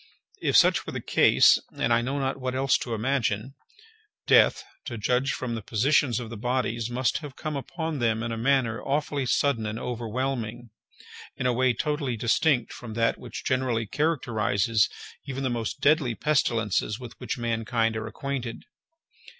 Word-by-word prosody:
If - - +3
such - - +4
were - - -5
the - - -3
case - - +5 0.2
(and 115 - +2
I 115 - +3
know 135 +4 -2
not 135 0 -2
what 130 0 -2
else 135 0 +2
to 120 -2 -3
imagine), 120 0 -1 0.7
death, - - +5 0.2
to 120 - -5
judge 125 +5 +1
from 125 -2 -3
the 115 - -4
positions 120 +3 +2
of 115 -2 -7
the 115 - -6
bodies, 120 -1 -1
must 125 +1 0
have 145 -4 -9
come 155 -1 -4
upon 160 +2 -4
them 115 -2 +1
in 115 - -3
a - - -2
manner 125 -2 +1
awfully 140 -1 -1
sudden 125 -3 +1
and 110 +1 -4
overwhelming, 120 -1 -3 0.7
in 130 - -3
a 125 - +3
way 130 +1 +2
totally 145 -1 -2
distinct 120 +3 +1
from 115 -3 -8
that 115 0 +1
which 120 -3 -8
generally 125 -3 0
characterizes 115 -6 +1 0.4
even 135 0 -4
the 130 - 0
most 115 -2 -3
deadly 145 -5 +3
pestilences 115 -4 0
with 125 -2 -9
which - - -4
mankind 115 -1 0
are 110 0 -4
acquainted. 125 -1 -5
120 Hz, 165 wpm, -26 LUFS, 115-135 Hz, 0.7 s, case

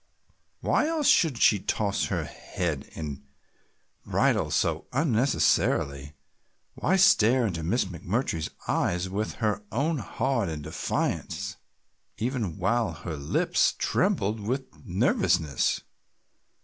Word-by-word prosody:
Why 300 - +2
else 320 -2 -1
should 155 -8 +4
she 105 - +5
toss 100 +1 0
her - - -1
head 80 -6 -4
and 75 -3 -5 0.8
bridle - - +1
so - - 0
unnecessarily, 110 - +1 0.6
why 190 - +1
stare 130 - +5
into 85 -6 -2
Miss 100 +10 +1
McMurtry's 90 - -2 0.2
eyes 90 +1 0
with 105 +3 -2
her 105 -2 -1
own 145 +5 0
hard 115 -2 -1
and 75 -2 -5
defiant, 80 +2 -2 0.6
even 115 - -2
while 120 -1 +1
her 85 - -6
lips 70 -1 +1
trembled 105 +3 +1
with 125 +6 -2 0.2
nervousness? 90 - +1
105 Hz, 110 wpm, -27 LUFS, 85-125 Hz, 0.8 s, she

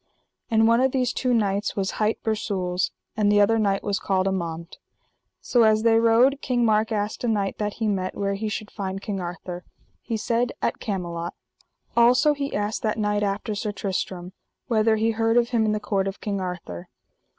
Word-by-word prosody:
And 225 -1 +4
one 230 +2 +4
of 265 0 +2
these 250 -2 +1
two 255 - 0
knights 205 -3 +1
hight 210 +2 0
Bersules, 190 -4 -1 0.3
and 210 -2 +2
the 205 - +4
other 225 +2 +4
knight 200 -2 +1
was 205 0 -1
called 190 -1 0
Amant. 170 -3 -4 0.6
So 240 - +2
as 215 -1 +4
they 225 -1 +5
rode 235 +5 +4
King 245 -2 +1
Mark 220 0 +2
asked 210 +1 -2
a - - 0
knight 205 -3 -1
that 210 -1 -1
he 225 - -2
met, 185 -3 -1
where 200 0 -1
he 215 +2 -3
should 210 0 -5
find 195 -1 -4
King 200 0 -4
Arthur. 175 0 -6 0.4
He 225 - -3
said: 235 +2 0
At - - -1
Camelot. 175 -4 -4 0.6
Also 250 +6 +5
he 280 -1 -4
asked 205 +1 -2
that 215 -1 -1
knight 210 -1 0
after 205 +2 -1
Sir 210 +1 -3
Tristram, 190 -2 -4 0.3
whether 220 -2 +2
he 220 +1 +1
heard 225 +1 +1
of 240 0 +3
him 230 -3 +2
in - - +2
the 215 - 0
court 200 -2 -1
of 195 - -5
King 200 -2 -3
Arthur. 175 - -6
210 Hz, 195 wpm, -24 LUFS, 195-225 Hz, 0.6 s, they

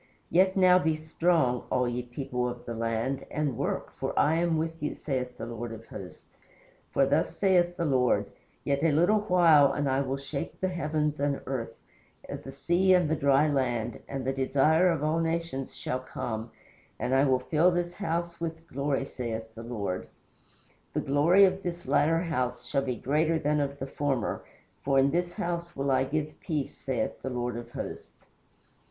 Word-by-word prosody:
Yet 185 +2 +4
now 185 -1 +6
be 160 -3 +1
strong, 155 -5 +1
all 125 -1 +1
ye 120 0 -2
people 125 0 -3
of 120 0 -8
the 120 - -4
land, 115 +4 -1
and 150 -4 -1
work, - - -3
for - - -3
I 155 +2 +4
am 170 -1 +1
with 165 +1 -3
you, 150 - -2
saith 125 -3 -3
the - - -5
Lord 120 0 -5
of 115 0 -9
Hosts. 95 -4 -11 0.5
For 135 - +3
thus 145 +4 0
saith 175 -3 +3
the 170 - 0
Lord: 125 -7 +2 0.4
Yet 140 0 0
a 165 0 +3
little 175 +8 +4
while 170 -8 +5
and 145 -1 -1
I 135 +1 +2
will 135 0 -2
shake 140 +1 -5
the 185 - 0
heavens 150 -3 -1
and 140 -1 0
earth, 115 -4 -4 0.5
the 135 - -7
sea 175 +7 +3
and 175 -4 +2
the - - +3
dry 140 +1 +3
land, 120 -5 -1
and 135 -2 -4
the 135 - 0
Desire 145 +6 +3
of 160 -4 0
all 155 +2 +1
nations 165 -5 -2
shall 130 - -2
come, 115 -3 -5 0.5
and 125 - -1
I 135 +1 +5
will 130 -2 +4
fill 155 +7 +3
this 175 0 -1
house 170 -2 -3
with 165 0 -4
glory, 140 0 -1
saith 115 -4 -5
the 115 - -9
Lord. 105 -6 -4 0.9
The - - 0
glory 165 +8 +5
of 190 0 0
this 175 -1 -5
latter 165 +2 +3
house 130 -8 -2
shall 140 - 0
be 130 -2 -2
greater 155 +7 +1
than 150 -1 +1
of 140 -1 -2
the 135 - -4
former, 135 -3 -2 0.4
for 135 0 +2
in 135 +1 +4
this 175 +1 0
house 170 0 -3
will 135 0 0
I 130 0 +3
give 155 +2 -3
peace, 150 -5 -3
saith 130 -3 -3
the - - -3
Lord 125 -1 -2
of 120 0 -7
Hosts." - - -8
140 Hz, 185 wpm, -28 LUFS, 130-165 Hz, 0.9 s, now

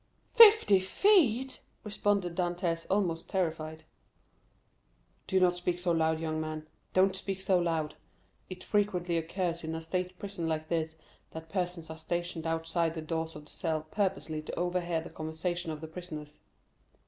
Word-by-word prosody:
"Fifty 440 - +8
feet!" 265 - +3 0.2
responded 200 -4 0
Dantès, 175 -1 -1
almost 180 -4 0
terrified. 160 -4 -2 1.4
"Do 190 - +3
not 180 -1 +3
speak 175 0 -1
so 175 -1 0
loud, 160 -1 +2
young 160 -1 -2
man—don't 155 +5 -1
speak 190 0 -4
so 190 -1 +2
loud. 165 -3 0 0.6
It 185 -1 -8
frequently 185 -5 +1
occurs 170 +1 -1
in 160 0 -3
a 160 - -4
state 180 +2 -2
prison 195 -4 -4
like 155 0 -2
this, 160 -1 -1 0.4
that 160 0 -8
persons 175 -3 -3
are 160 - -8
stationed 170 0 -3
outside 165 0 0
the 160 - -3
doors 160 0 -3
of 150 0 -9
the - - -14
cells 160 -2 -2
purposely 190 -6 -1
to 155 - -6
overhear 175 -2 0
the - - -10
conversation 160 +2 -3
of 155 -1 -6
the 160 - -6
prisoners." 155 -3 -8
170 Hz, 150 wpm, -31 LUFS, 160-185 Hz, 1.4 s, Fifty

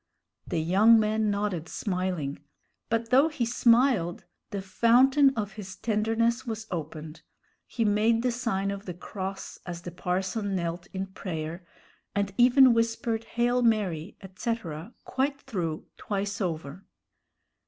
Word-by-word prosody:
The - - -2
young 200 +8 +5
man 215 0 +1
nodded, 200 -5 -2
smiling; 180 -7 -2 0.5
but 230 0 -1
though 270 +5 +6
he 300 -7 -2
smiled, 230 -7 +3 0.2
the 200 - -3
fountain 245 +8 +4
of 210 -2 -2
his 195 -2 -8
tenderness 225 +3 0
was 220 -3 -5
opened. 155 -1 -6 0.5
He 230 - -1
made 220 +3 +3
the 250 - +2
sign 200 -5 -1
of 200 0 -7
the 180 - -5
cross 190 +1 -6
as 175 -1 -7
the 175 - -6
parson 190 +4 -2
knelt 175 0 -3
in 190 0 -4
prayer, 170 -2 -6 0.5
and 200 -1 0
even 255 +1 +7
whispered 230 0 0
"Hail 245 +1 +1
Mary," 205 -7 0
etc., 190 -2 -5
quite 275 +2 -1
through, 175 - -4
twice 205 +1 -3
over. 165 -1 -4
205 Hz, 130 wpm, -27 LUFS, 180-230 Hz, 0.5 s, even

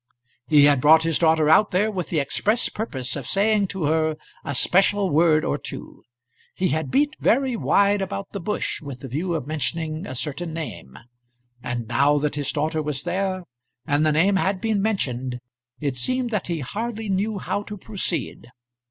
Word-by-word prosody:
He 150 -2 +6
had 145 -3 +4
brought 160 +3 +6
his 165 -2 +1
daughter 160 -2 +3
out 185 +7 +5
there 205 +4 +1
with 185 -4 -4
the 165 - -1
express 210 - +1
purpose 135 - -4
of 135 -4 -6
saying 205 0 +2
to 190 -2 -4
her 155 +1 +1 0.3
a 140 -3 -4
special 195 +6 +3
word 155 0 +4
or - - -1
two; - - -9 0.5
he 185 -1 0
had 155 -2 -1
beat 290 - +2
very 260 +1 +2
wide 200 -2 +2
about 195 +1 -4
the 200 - -5
bush 210 +4 -3
with 140 -4 -8
the 135 - -6
view 165 +7 -2
of 155 - -3
mentioning 155 +3 -3
a 130 - -6
certain 155 +5 -3
name; 105 - -7 0.6
and 120 -2 -4
now 140 +5 +3
that 145 0 -1
his 145 -1 -1
daughter 155 +1 -1
was 145 -2 -3
there, 190 -1 -2 0.4
and 145 +1 +1
the 155 - +3
name 185 +6 +3
had 190 0 0
been 220 -2 0
mentioned, 130 - -1 0.4
it 140 -3 -2
seemed 250 - -1
that 210 -5 -2
he 170 -3 -2
hardly 220 - -4
knew 200 +2 0
how 200 - -2
to 210 0 -8
proceed. 185 - -3
165 Hz, 185 wpm, -23 LUFS, 145-200 Hz, 0.6 s, He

